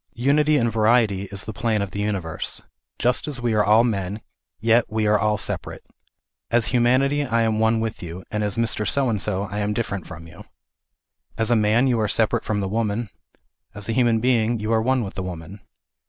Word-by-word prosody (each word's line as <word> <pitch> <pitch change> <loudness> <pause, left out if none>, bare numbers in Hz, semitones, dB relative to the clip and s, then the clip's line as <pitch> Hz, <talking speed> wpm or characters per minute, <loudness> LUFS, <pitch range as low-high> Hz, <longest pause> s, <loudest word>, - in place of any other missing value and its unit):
Unity 145 +4 +3
in 120 -3 +2
variety 110 -3 +2
is 100 0 -5
the 110 - -6
plan 110 +1 0
of 100 - -6
the 100 - -4
universe. 100 -6 -3 0.3
Just 125 +4 0
as 145 -4 -3
we 120 -2 0
are 105 -1 +3
all 110 +3 +5
men, 100 -3 -2 0.4
yet 115 +1 +3
we 110 0 -1
are 105 0 +3
all 105 0 +1
separate. - - -4 0.6
As 120 -1 +2
humanity 130 +4 +3
I 115 -4 +1
am 110 -1 0
one 110 0 +2
with 110 0 -3
you, 85 +2 -7
and 105 0 -1
as 105 +1 -2
Mr. 115 -2 0
So 135 -3 +1
and 105 -3 -1
so 100 -2 -1
I 100 +1 -5
am 105 0 -1
different 100 -5 -3
from 80 +1 -10
you. 85 +5 -13 0.9
As 115 +1 0
a - - +5
man 110 +3 +3
you 125 -3 +1
are 110 - +1
separate 110 +1 +1
from 105 -1 -1
the 95 - -2
woman; 110 +1 -2 0.7
as 105 0 -4
a - - +1
hu 125 +2 +3
man 115 -1 +3
being 115 -1 +1
you 110 +2 -1
are 110 - +3
one 130 +1 +1
with 95 - -6
the 95 - -5
woman. 90 +1 -7
110 Hz, 215 wpm, -23 LUFS, 105-120 Hz, 0.9 s, all